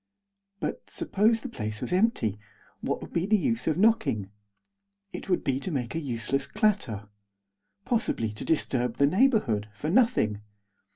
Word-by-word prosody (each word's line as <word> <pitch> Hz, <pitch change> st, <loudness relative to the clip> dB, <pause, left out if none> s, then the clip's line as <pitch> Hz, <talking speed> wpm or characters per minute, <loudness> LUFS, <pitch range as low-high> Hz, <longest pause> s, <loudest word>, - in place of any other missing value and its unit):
But, -, -, -4 dB
suppose 220 Hz, +3 st, +1 dB
the -, -, -5 dB
place 110 Hz, -, -4 dB
was -, -, -3 dB
empty, 180 Hz, -, +1 dB, 0.4 s
what -, -, -2 dB
would -, -, -10 dB
be 170 Hz, +2 st, 0 dB
the 215 Hz, 0 st, +4 dB
use 230 Hz, +2 st, -1 dB
of 160 Hz, -, +2 dB
knocking? 140 Hz, -, +2 dB, 0.8 s
It -, -, -7 dB
would 180 Hz, -, +1 dB
be 135 Hz, -1 st, 0 dB
to 165 Hz, -, -4 dB
make 130 Hz, -8 st, -2 dB
a 165 Hz, -, -1 dB
useless 135 Hz, 0 st, -1 dB
clatter. 165 Hz, -, 0 dB, 0.8 s
Possibly 220 Hz, -, 0 dB
to 105 Hz, -, -6 dB
disturb 125 Hz, -6 st, 0 dB
the 140 Hz, -, +5 dB
neighbourhood, 170 Hz, -, +2 dB
for 155 Hz, +9 st, -3 dB
nothing. 215 Hz, -, +3 dB
150 Hz, 155 wpm, -27 LUFS, -, 0.8 s, the